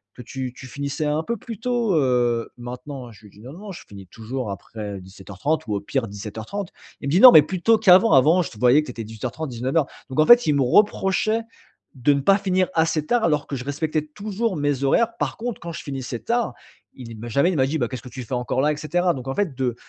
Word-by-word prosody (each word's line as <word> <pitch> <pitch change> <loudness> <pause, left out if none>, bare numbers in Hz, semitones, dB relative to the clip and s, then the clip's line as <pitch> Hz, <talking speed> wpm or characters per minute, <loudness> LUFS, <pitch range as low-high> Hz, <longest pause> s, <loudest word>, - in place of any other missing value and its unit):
que - - -10
tu 130 +1 -6
tu 130 - -11
finissais 140 +4 -4
un 150 +2 0
peu 235 +7 -3
plus 225 +1 -9
tôt, 235 -5 0
heu, 125 -5 +1
maintenant», 125 +1 -8
je 105 0 -17
lui 105 - -15
dis: 100 - -19
«Non, 130 +5 -10
non, 200 +4 -9
je 180 - -10
finis 100 -1 -11
toujours 115 +2 -5
après 100 +1 -7
17:30 100 - -4
ou 105 - -1
au - - -1
pire 120 +4 -2
17:30». 110 - -6 0.3
Il - - -5
me - - -1
dit: 180 - +4
«Non 255 - +12
mais 155 - +9
plus 180 +4 -5
tôt 225 0 +5
qu'avant. 195 0 +6
Avant, 155 +7 +5
je 145 - -8
te 110 - -14
voyais 125 +5 +5
que 150 - -9
tu - - -5
étais 115 -2 -7
18:30, 120 +8 -6
19:00». 130 +5 -1 0.2
Donc 130 - -4
en 155 - +6
fait, 240 0 +8
il 150 - +3
me 140 - +2
reprochait 205 - +2 0.5
de 135 +3 +2
ne 140 - 0
pas 195 +8 +4
finir 185 -2 +1
assez 160 -2 +1
tard 240 +6 +1
alors 150 -5 +1
que 140 - -4
je 125 - -5
respectais 150 +2 -2
toujours 210 0 -2
mes 145 -2 -1
horaires. 230 +12 +2
Par - - -2
contre, 240 0 -4
quand 170 - -6
je - - -6
finissais 135 -4 -5
tard, 235 - -1 0.4
il 115 -3 -10
m'a 120 +2 -7
jamais 140 +9 +2
il - - -3
m'a 130 - +3
dit: 155 +4 -1
«Bah, 120 - 0
qu'est-ce 125 0 -7
que 125 - -10
tu 130 +2 -8
fais 125 - -8
encore 125 +1 -1
là?» 150 +2 +2
et - - -7
cetera. 175 +4 0
Donc 130 -1 -8
en 135 - -2
fait, 190 -10 -1
de 125 -3 -1
140 Hz, 255 wpm, -22 LUFS, 120-180 Hz, 0.5 s, Non